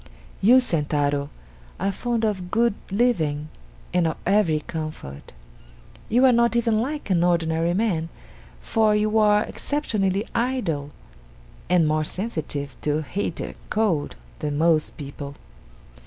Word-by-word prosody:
"You, 245 +6 +7
Sentaro, 145 - 0 0.5
are 195 - 0
fond 235 +2 -1
of 190 -4 -2
good 235 +2 +2 0.2
living 160 -10 +1 0.4
and 175 -2 +3
of 160 - -2
every 180 -6 +3
comfort. 155 - -7 0.8
You 245 +4 +4
are 260 - +7
not 235 0 +3
even 230 -2 +2
like 290 -3 -3
an 175 -2 +3
ordinary 170 -1 +1
man, 180 -6 0 0.5
for 220 - +2
you 215 +1 +2
are 210 0 +4
exceptionally 210 -9 -1
idle, 200 - -1 0.8
and 175 -3 +4
more 155 0 +1
sensitive 155 -7 -4
to 150 +1 0
heat 175 +2 -3
and - - -5 0.2
cold 205 -9 0 0.2
than 145 -1 -2
most 160 -1 +2
people. 140 -1 -7
180 Hz, 125 wpm, -24 LUFS, 155-220 Hz, 0.8 s, You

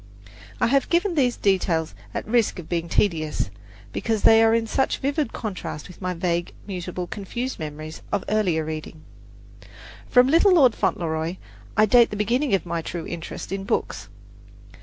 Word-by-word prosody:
I - - +3
have 275 +3 +2
given 350 +2 +2
these 255 -6 +2
details 175 -5 +1 0.2
at - - -4
the 215 - -9
risk 235 -4 +2
of 175 -3 -8
being 170 -1 -2
tedious, 155 - 0 0.4
because 225 -2 -1
they 225 0 +7
are 225 0 +5
in 230 0 +1
such 265 +4 0
vivid 280 -1 -1
contrast 190 -8 -5
with 180 - -14
my 180 -1 -2
vague, 170 0 -1
mutable 180 -2 -4
and 175 - -10
confused 240 +6 -4
memories 155 0 -7
of 195 - 0
earlier 185 -7 +1
reading. 155 0 -6 1.1
From 250 -1 +6
"Little 340 +7 +5
Lord 260 -8 +6
Fauntleroy" 160 -2 -1 0.4
I 215 - +6
date 235 +2 +5
the - - -5
beginning 235 +4 +1
of 190 - -2
my 170 -1 -2
true 170 0 -5
interest 170 +1 -6
in 195 0 -3
books. - - -2
195 Hz, 170 wpm, -24 LUFS, 170-240 Hz, 1.1 s, they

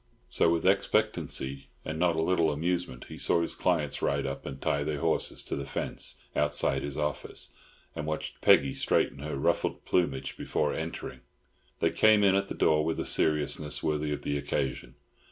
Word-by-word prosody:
So 85 - +3
with 85 0 0
expectancy 85 -9 +1 0.2
and 80 0 -4
not 85 -1 +3
a 80 - +1
little 85 -2 +2
amusement 85 -3 -2
he - - -9
saw 85 - +2
his - - -3
clients 80 -6 0
ride 70 0 0
up 70 0 -5
and 65 - -6
tie 70 +1 0
their 75 0 -2
horses - - 0
to - - -4
the 70 - -3
fence 65 - -2 0.2
outside 75 -2 +1
his 70 0 -4
office, 75 -2 -4 0.4
and 75 - -4
watched 80 0 -4
Peggy 70 0 +5
straighten 70 - +1
her 75 0 -4
ruffled 70 - 0
plumage 70 -7 0
before 75 -1 -1
entering. 80 +1 -5 0.6
They - - +3
came 110 -1 +5
in 95 -1 +5
at 100 0 +1
the - - -5
door 75 0 +3
with 80 +1 -1
a - - -2
seriousness 75 -1 +1
worthy 75 -1 0
of 75 - -3
the 70 0 -1
occasion. 70 -2 -3
75 Hz, 180 wpm, -29 LUFS, 70-85 Hz, 0.6 s, Peggy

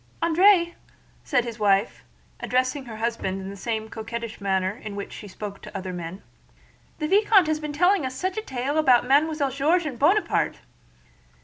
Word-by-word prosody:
"André," 345 +1 +4 0.5
said 270 -5 +1
his 235 -1 -7
wife, 200 0 +1 0.4
addressing 255 +2 0
her 230 -3 -8
husband 225 -4 -2
in 190 0 -6
the - - -8
same 220 +2 -3
coquettish 230 0 -6
manner 190 -1 0
in 215 -1 -8
which 200 - -6
she 210 - -9
spoke 200 +1 -8
to 200 - -7
other 185 -1 -5
men, 175 +2 -7 0.7
"the 305 - -2
vicomte 400 0 +5
has 310 0 0
been 300 -1 -4
telling 355 +4 +3
us 260 0 -4
such 370 +6 -2
a 435 - -2
tale 275 - -2
about 255 -6 +4
Mademoiselle 290 +1 +2
George 315 +6 +1
and 265 -6 -5
Buonaparte!" 380 +9 +2
255 Hz, 175 wpm, -25 LUFS, 210-315 Hz, 0.7 s, vicomte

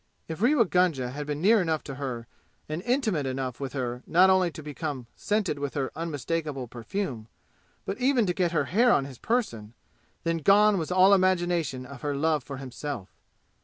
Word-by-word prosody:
If 160 +3 -6
Rewa 245 0 +4
Gunga 170 -9 +1
had 145 +2 -6
been 150 +2 -3
near 215 +1 +5
enough 160 -3 -1
to 140 - -7
her 130 -4 -5 0.4
and 155 +3 -4
intimate 220 - 0
enough 130 -1 -3
with 135 -2 -5
her 125 -2 -3
not 185 +3 +5
only 185 -2 +3
to 155 -1 -10
become 145 -3 -5
scented 205 -8 -1
with 140 -1 -4
her 135 -2 -1
unmistakable 155 -4 -3
perfume 120 - -5 0.6
but 195 - -4
even 255 -3 +3
to 180 - 0
get 175 -2 0
her 165 - +1
hair 240 +6 +3
on 135 - +3
his 135 -3 -10
person, 120 - -2 0.5
then 165 0 0
gone 200 +4 +5
was 160 +1 -4
all 185 +2 +6
imagination 175 -8 +1
of 140 -1 -11
her 145 -1 -2
love 155 0 +1
for 140 +1 -7
himself! 130 -4 -6
155 Hz, 185 wpm, -27 LUFS, 135-185 Hz, 0.6 s, all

